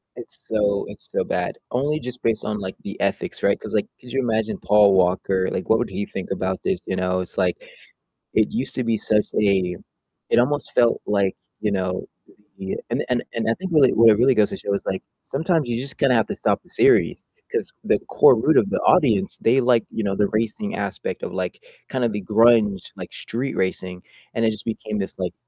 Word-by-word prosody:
It's - - -11
so 100 -2 +1
it's - - -4
so - - 0
bad, - - -2
only 145 +5 0
just 125 0 -7
based 115 -2 +1
on, 105 -1 -2
like, 95 -1 -5
the - - -7
ethics, - - -2
right? - - +2
'Cause, - - -8
like, - - +1
could 125 -1 -13
you 135 - 0
imagine 110 -2 -1
Paul 105 -1 +5
Walker, 95 +1 +2
like, 95 - -4
what 110 +1 +4
would 120 - -1
he 100 - -3
think 95 - -7
about 95 -1 -2
this, 190 - 0
you 95 - -2
know? 90 0 0
It's 90 - -6
like, 90 -2 +1 0.8
it 110 -1 +2
used 125 +4 -2
to 125 - -1
be 115 -1 +1
such 105 0 +2
a 95 -3 +2 0.5
it - - +3
almost 145 +4 0
felt 120 -1 +3
like, 100 -2 +1 0.2
you 105 -1 -1
know, 95 -1 -2 0.5
the 95 0 -4
and 120 +4 -1
and 125 -1 +1
and 115 -1 -1
I - - +3
think 185 0 -6
really 145 -5 +5
where 115 -1 +7
it - - -1
really 130 +1 +4
goes 105 -1 +3
to - - -4
show 100 - -4
is 100 - -2
like 95 - -2 0.2
sometimes 160 -1 0
you 120 -1 -1
just 135 0 -8
gonna 135 -2 +3
have 110 - +2
to - - -4
stop - - 0
the - - -25
series, - - +3 0.3
'cause - - -2
the - - +2
core 125 - +6
root 155 +7 +3
of 200 - +4
the - - 0
audience, 110 - +3
they 125 +4 +4
like, 120 -2 +3
you 110 - -3
know, 100 -1 -1
the 100 0 +2
racing 115 - -2
aspect 480 - -4
of, - - -4
like, - - -4 0.3
kinda 130 -3 0
the 105 -1 -4
grunge, 110 -3 +3
like, - - -8
street 130 +4 -4
racing, 90 -1 -2 0.3
and 115 - +1
it 110 - +3
just 105 - -7
became 110 -2 -3
this 95 - -3
like 90 -1 -2
110 Hz, 225 wpm, -22 LUFS, 95-125 Hz, 0.8 s, where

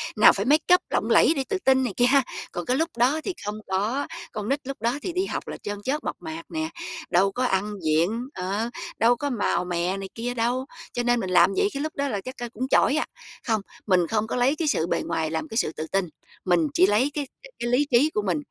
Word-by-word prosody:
nào 215 - +7
phải 200 +2 -2
makeup 315 +6 +4
lộng - - 0
lẫy - - +6
để 270 - 0
tự 385 - 0
tin 265 -4 +3
này 235 -6 -2
kia 245 - +5
ha, 270 +1 +5 0.3
còn 175 - -4
cái 255 +2 +1
lúc 330 +1 +1
đó 255 +6 +3
thì 385 - -2
không 210 +1 -4
có. 215 +10 -1 0.2
Con 215 +1 -4
nít 280 +1 +1
lúc 275 -5 -6
đó 235 +4 +1
thì 355 - -4
đi 370 +1 0
học - - -4
là - - -5
chân 205 0 -4
chất, 285 +6 -2
mộc - - -3
mạc 160 +1 -7
nè, 160 -1 -2 0.4
đâu 190 +3 +3
có 250 +5 -2
ăn 205 -2 0
diện, 180 +11 +1
ờ, 200 +5 -2 0.3
đâu 235 +2 +5
có 285 +3 -3
màu 210 -6 0
mè 180 +2 -1
này 195 -1 -6
kia 240 +2 -3
đâu, 245 +2 0 0.3
cho 245 - -1
nên 240 0 +2
mình 190 -4 -3
làm 185 +2 +5
vậy 405 - +4
cái 280 - -3
lúc 310 - -4
đó 280 0 0
là 205 -6 -2
chắc, 255 +1 -8
ơ, 240 -1 -5
cũng 255 +4 -3
chỏi 280 - +4
à. - - +1 0.4
Không, 220 -3 +1 0.3
mình 180 -3 +3
không 220 0 0
có - - -3
lấy 250 +4 +3
cái 315 0 -2
sự 170 - +1
bề - - 0
ngoài 160 -1 -1
làm 160 -1 -2
cái 225 - -5
sự 160 - +1
tự 160 - -4
tin, 195 -1 +1 0.4
mình 175 -3 +3
chỉ 185 - +5
lấy 230 +8 +2
cái 290 -3 -3 0.3
cái 240 - -2
lý 255 +4 +3
trí 265 +6 +5
của 210 - +1
mình, 180 -6 0
230 Hz, 260 wpm, -25 LUFS, 190-265 Hz, 0.4 s, nào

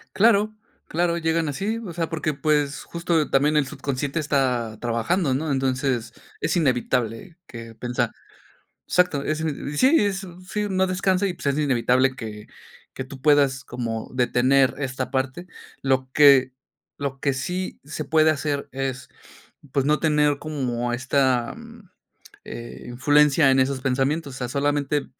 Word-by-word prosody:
Claro, 215 0 +4 0.3
claro, 170 +1 0
llegan 165 -1 0
así. 200 +10 -2
O 180 - -6
sea, 165 -1 -3
porque, 155 -2 -2
pues, 145 0 0
justo 170 -2 0
también 150 +3 +3
el 140 -3 +2
subconsciente 140 +3 -3
está 125 -7 0
trabajando, 125 +7 0
¿no? 150 +3 -1
Entonces, 130 -3 -1 0.3
es 160 +3 0
inevitable 125 - 0
que, 115 -1 -10
pensar. 120 0 -2 0.7
Exacto, 180 -6 +2
es 155 +2 -1
ine 150 -1 -4
sí, 260 - +4
es, 195 -1 -2 0.2
sí, 210 +1 -2
no 190 -1 +1
descansa, 185 +1 +1
y 180 - -3
pues - - -9
es 140 0 +2
inevitable 130 -1 +2
que, 105 -3 -8 0.5
que 130 - -5
tú 130 0 -11
puedas 140 -3 +3
como 115 -2 -5
detener 130 +2 +3
esta 130 -1 -3
parte. 130 +6 -2 0.4
Lo 130 -1 0
que, 140 -3 +6 0.5
lo 140 -1 -4
que 140 - +1
sí 180 +8 -4
se 145 - -5
puede 155 +1 +4
hacer 145 -1 -2
es, 135 -1 -4 0.6
pues 140 -1 +1
no 150 +1 +2
tener 150 -2 +2
como 125 -6 -2
esta, 130 -1 +1
mm, 230 -4 -14 0.5
eh, 120 0 -8
influencia 145 +3 +4
en 130 - +4
esos 130 0 0
pensamientos. 135 +2 0
O - - -8
sea, 125 -1 -3
solamente 145 +1 0
140 Hz, 150 wpm, -23 LUFS, 130-160 Hz, 0.7 s, que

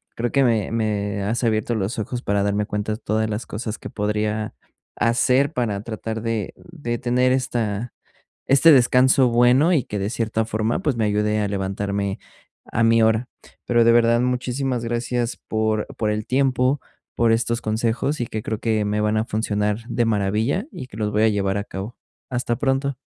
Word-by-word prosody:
Creo 120 +1 -2
que 140 - +3
me 115 -5 +1
me 105 -3 -1
has 115 +5 -1
abierto 110 0 +1
los 105 +2 -2
ojos 120 +3 -3
para 100 0 0
darme 100 +1 0
cuenta 105 +1 -2
de 110 - -3
todas 110 +1 0
las 110 +2 -4
cosas 110 +1 -5
que - - -8
podría 105 +1 -2 0.4
hacer 125 +4 +2
para 110 -8 -1
tratar 110 0 -5
de 115 -4 -2
de 145 -9 -5
tener 125 +1 +2
esta 120 -3 -1 0.6
este 140 +4 +6
descanso 130 0 +5
bueno, 125 +8 +4
y 140 -8 +2
que 105 - -5
de 100 +2 -1
cierta 110 -1 -1
forma, 110 +1 -1
pues, 145 -5 0
me 110 - 0
ayude 105 +1 +1
a 105 - 0
levantarme 100 0 -2 0.5
a 115 - +1
mi 115 0 +4
hora. 110 +2 +2 0.4
Pero, 120 -1 +3
de 115 - +5
verdad, 115 0 +4
muchísimas 125 0 -1
gracias 120 0 -2
por 110 -1 0
por 105 -1 0
el 105 0 -2
tiempo, 130 +1 +2 0.4
por 115 -1 +3
estos 115 0 0
consejos, 115 +6 -1
y 120 - -2
que 110 -1 -5
creo 110 -1 -3
que 110 -2 0
me 105 +1 0
van 105 0 +1
a 110 - 0
funcionar 105 -1 -1
de 120 -1 0
maravilla, 110 - 0
y 130 - -8
que 105 - -12
los 105 -1 -1
voy 105 +1 +2
a 110 - +5
llevar 100 -1 0
a 100 - -2
cabo. 100 +4 -7 0.3
Hasta 120 -2 -1
pronto. 135 -1 0
115 Hz, 185 wpm, -22 LUFS, 105-120 Hz, 0.6 s, este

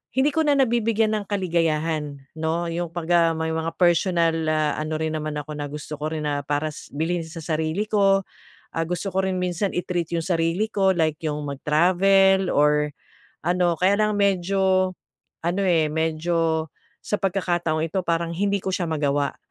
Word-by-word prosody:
hindi 275 +2 +2
ko 320 - +2
na 285 -1 +3
nabibigyan 225 -3 +2
ng 205 - -5
kaligayahan, 160 -6 0 0.2
'no? 160 +2 -1
Yung 170 0 -3
'pagka 170 -1 +2
may 160 0 -1
mga 160 +1 -3
personal, 175 -1 +3 0.2
ah, 155 -1 +1
ano 155 0 -2
rin 160 0 -2
naman 155 0 -4
ako 150 +1 -5
na, 145 0 -3
gusto 150 +1 -7
ko 155 - -1
rin 155 -1 -3
na, 145 -1 -1
para 150 +1 -1
sa - - -11
bilhin 165 +2 0
sa 165 0 -8
sarili 160 +5 -1
ko. 195 -2 +3 0.5
Ah, 165 - 0
gusto 180 +3 -2
ko 190 0 +1
rin 185 -1 -1
minsan 180 +2 -1
i-treat 175 -1 -2
yung 165 -1 -1
sarili 170 +4 +1
ko, 195 -3 +2
like 155 -2 +1
yung 150 -1 -1
mag-travel 185 +6 +3
or 150 0 +3 0.5
ano 175 -1 +2
Kaya 195 +3 +3
lang 210 -1 +2
medyo, 190 -1 +2 0.5
ano, 175 +4 0
eh, 165 -4 +3
medyo 160 0 0 0.4
sa 210 - 0
pagkakataong 175 -4 0
ito 175 +4 -2
parang 170 0 0
hindi 200 +3 0
ko 190 - -3
siya 175 -3 -1
magawa. 145 -2 0
170 Hz, 170 wpm, -23 LUFS, 155-190 Hz, 0.5 s, na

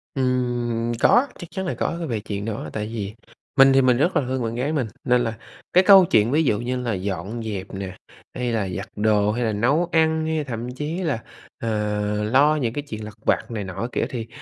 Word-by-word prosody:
Ừm, 120 -3 0
có, 255 +4 +5
chắc 175 - -7
chắn 190 - -4
là - - -1
có 170 - -2
về 115 -3 -1
chuyện 100 -1 -5
đó. 110 -1 -4
Tại 105 -1 -3
vì 105 -2 -5 0.4
mình 135 0 +8
thì 135 - +5
mình 125 -2 +4
rất 170 +8 +1
là 145 - +4
thương 130 -1 -1
bạn 115 0 -3
gái 140 +6 -1
mình, 130 -7 0 0.2
nên 125 0 +3
là 115 - -2 0.4
cái 185 - +6
câu 190 -1 +8
chuyện 110 -4 +3
ví 160 +2 +3
dụ 105 -7 +1
như 125 +2 -2
là 120 -3 -1
dọn 100 +4 -4
dẹp 100 -3 -4
nè, 95 -1 -6 0.4
hay 125 -1 -1
là 105 -4 -1
giặt 95 +2 -5
đồ 105 0 +2
hay 120 +2 -1
là 110 - 0
nấu 140 +11 +1
ăn 160 -1 +2
hay 160 -1 0
thậm 120 -2 -5
chí 150 +6 -4
là, 140 -9 -1 0.4
ờ, 115 - -2 0.5
lo 140 +7 +4
những 120 -6 -1
cái 145 - -2
chuyện 110 -4 -6
lặt 105 0 -8
vặt - - +1
này 110 -3 -3
nọ 95 +5 -4
c - - -16
kiểu - - 0
thì 115 -3 -5
120 Hz, 235 wpm, -23 LUFS, 110-140 Hz, 0.5 s, mình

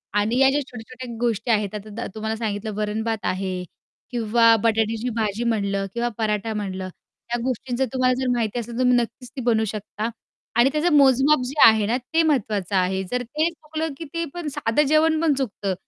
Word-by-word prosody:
आणि 215 +4 +1
या 270 - +6
ज्या 285 +2 +1
छोट्या-छोट्या 250 -1 -9
गोष्टी 235 0 0
आहेत, 210 -2 0
आता 210 +1 -7
दा 235 - -4
तुम्हाला 220 0 -2
सांगितलं, 215 -1 -3
वरण-भात 215 +1 -2
आहे 185 -1 -2 0.5
किंवा 230 -1 +4
बटाट्याची 225 +1 +1
भाजी 220 0 -1
म्हटलं 200 -4 0
किंवा 235 0 -1
पराठा 220 0 -1
म्हटलं, 190 -3 -4
त्या 235 +5 -8
गोष्टींचं 260 +1 -1
तुम्हाला 255 -1 +3
जर 260 - 0
माहिती 230 0 -1
असेल 235 0 -6
तर 235 - -5
तुम्ही 250 -1 +4
नक्कीच 240 +1 -3
ती 265 - -4
बनवू 225 -2 +2
शकता 215 +1 -4 0.5
आणि 240 +3 +5
त्याचं 310 +2 +2
मोजमाप 275 +2 +5
जे 275 +4 -5
आहे 220 -2 +4
ना, 235 +3 +1
ते 320 +6 0
महत्त्वाचं 210 - 0
आहे 190 +1 +1
जर 250 0 0
ते 305 +7 0
चुकलं 315 -1 -5
की 330 - -7
ते 335 0 -1
पण 345 -3 -5
साधं 225 +6 +2
जेवण 310 +1 +3
पण 320 -3 +3
चुकतं. 210 -7 -2
230 Hz, 190 wpm, -23 LUFS, 215-260 Hz, 0.5 s, या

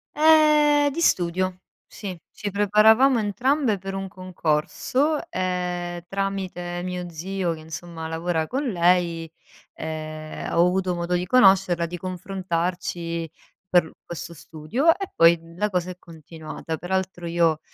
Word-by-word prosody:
Ehm, 300 -1 +5
di 335 - -3
studio, 185 - +1 0.3
sì. 190 -4 -7
Ci 205 - -5
preparavamo 220 +6 +5
entrambe 230 +3 +1
per 195 +1 -6
un 195 0 -4
concorso 185 - -1
e 180 -1 -2
tramite 190 -3 -3
mio 180 -1 -4
zio 175 +1 -2
che 160 - -9
insomma 160 +1 -7
lavora 160 0 -1
con 270 - -2
lei, 175 - +1 0.4
ehm, 155 -1 -6
ho 170 - +5
avuto 180 -1 0
modo 170 +1 -2
di 180 0 -1
conoscerla, 190 -5 +4
di 175 +1 -6
confrontarci 175 -2 -3 0.4
per 175 -3 +3
questo 170 0 -7
studio 165 - -2
e 390 -1 -5
poi 165 0 +6 0.2
la 210 +3 0
cosa 180 -2 -1
è 180 - -11
continuata. 160 -1 -8
Per 180 +1 -8
altro 190 -2 -2
io 165 -2 +2
180 Hz, 130 wpm, -24 LUFS, 170-195 Hz, 0.4 s, poi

